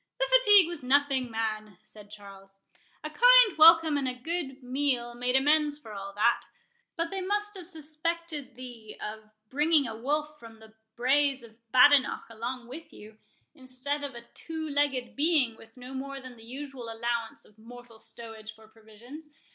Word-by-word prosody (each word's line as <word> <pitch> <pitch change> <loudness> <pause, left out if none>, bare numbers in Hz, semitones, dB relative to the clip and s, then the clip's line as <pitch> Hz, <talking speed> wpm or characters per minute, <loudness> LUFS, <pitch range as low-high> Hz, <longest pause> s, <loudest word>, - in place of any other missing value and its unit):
"The - - +1
fatigue 415 -8 +6
was 345 -5 -7
nothing, 270 -1 +2
man," 215 -3 -4
said 210 -1 -16
Charles; 195 -2 -14 0.5
"a - - -5
kind - - +6
welcome 320 -1 +7
and 275 -2 -1
a 255 - -3
good 275 -1 -5
meal 250 -2 -1
made 250 +1 -1
amends 295 +2 +2
for 225 -8 -12
all 200 0 -7
that. 235 +3 +2 0.5
But 335 0 -3
they 385 -1 -3
must 415 +2 -2
have 360 -3 -8
suspected 315 -3 -5
thee 240 -4 -10
of 215 0 -7 0.2
bringing 300 +1 +3
a 225 - -6
wolf 300 +5 -2
from 225 -1 -13
the 220 0 -17 0.2
braes 270 +1 +2
of 230 0 -19
Badenoch 270 +1 +5
along 235 +2 -6
with 315 +6 -10
you, 215 +1 -14 0.3
instead 275 +1 -5
of 275 -3 -5
a 235 0 -10
two 320 -1 -6
legged 285 -4 -1
being, 290 -6 +2
with 225 +2 -18
no 250 +1 -10
more 275 +1 -6
than 255 -2 -11
the 225 - -16
usual 260 -1 -8
allowance 230 0 -4
of 210 +1 -23
mortal 240 0 -14
stowage 220 -2 -11
for 220 0 -18
provisions. 225 +8 -14
255 Hz, 170 wpm, -28 LUFS, 230-300 Hz, 0.5 s, welcome